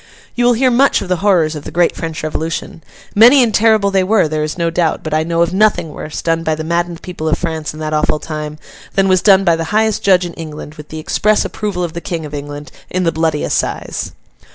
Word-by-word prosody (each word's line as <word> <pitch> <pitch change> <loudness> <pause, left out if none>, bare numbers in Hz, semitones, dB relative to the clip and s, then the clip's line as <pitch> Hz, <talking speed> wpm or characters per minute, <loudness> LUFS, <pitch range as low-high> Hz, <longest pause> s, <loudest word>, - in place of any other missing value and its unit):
You 245 - 0
will 245 - +5
hear 255 +2 +2
much 265 0 +3
of 185 - -9
the 180 - +1
horrors 175 -5 +2
of 150 - -7
the - - -7
great 170 +2 +1
French 160 -2 -5
Revolution. 160 +1 -4 0.3
Many 245 +5 +7
and 225 -3 0
terrible 215 -2 +3
they 190 -1 +2
were, 195 -2 +3
there 155 0 -2
is 155 +2 -4
no 170 -1 0
doubt; 170 -1 0
but 155 - -4
I 155 - +2
know 165 +1 +1
of 170 - -2
nothing 190 -5 +2
worse, 150 - -6
done 165 0 +1
by 160 -1 0
the 155 - -5
maddened 170 +1 -2
people 175 -4 -4
of - - +1
France 160 -4 -3
in 155 - -11
that 155 0 -3
awful 150 0 +1
time, 150 -1 -6 0.4
than 195 0 +3
was 185 -2 +3
done 195 -2 +5
by 170 -3 +3
the 165 0 -3
highest 215 +3 +1
judge 185 -2 +3
in 170 - -6
England, 155 -2 -8
with 150 -1 -12
the 155 - -7
express 210 +7 +1
approval 200 -4 -3
of 170 -2 -4
the 170 - -5
King 165 -3 -4
of 150 - -9
England, 145 0 -7 0.2
in 185 0 -1
The 165 - +2
Bloody 160 -2 0
Assize. - - -2
170 Hz, 250 wpm, -16 LUFS, 155-195 Hz, 0.4 s, Many